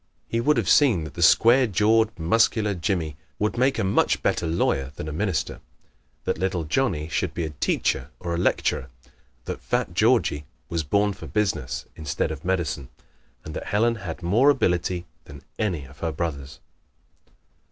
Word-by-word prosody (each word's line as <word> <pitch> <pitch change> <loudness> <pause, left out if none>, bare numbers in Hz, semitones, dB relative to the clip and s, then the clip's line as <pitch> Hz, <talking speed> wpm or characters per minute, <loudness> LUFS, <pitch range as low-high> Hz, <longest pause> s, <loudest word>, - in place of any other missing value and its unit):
He 115 - -1
would 150 +5 +3
have - - 0
seen 120 - +4
that 80 - -8
the 85 - -6
square 120 +8 +6
jawed 110 +2 +2
Muscular 105 +4 +2
Jimmie 85 -5 -2 0.2
would 105 +1 0
make 130 +3 +2
a - - 0
much 95 - +2
better 85 - +1
lawyer 70 -5 0
than 75 - -6
a - - -4
minister; 95 +1 -2 0.6
that - - -2
little 95 -2 -1
Johnnie 80 - 0
should 80 - -2
be 85 - -2
a 80 - -5
teacher 75 - -1
or 85 -1 -3
a - - -1
lecturer; 65 -6 0 0.6
that - - -5
fat - - -1
Georgie 75 0 +2 0.2
was 85 -2 -1
born 100 +7 +1
for 95 - -10
business 105 -2 -1
instead 80 0 -2
of 80 0 -7
medicine; 85 -7 -2 0.6
and 75 - -7
that - - -5
Helen 115 +3 +1
had 90 -3 -7
more 115 +11 +4
ability 90 -8 +1 0.2
than 70 -1 -12 0.2
any 90 -10 -1
of 70 +1 -16
her 85 - -1
brothers. 70 -5 -4
90 Hz, 170 wpm, -24 LUFS, 80-105 Hz, 0.6 s, square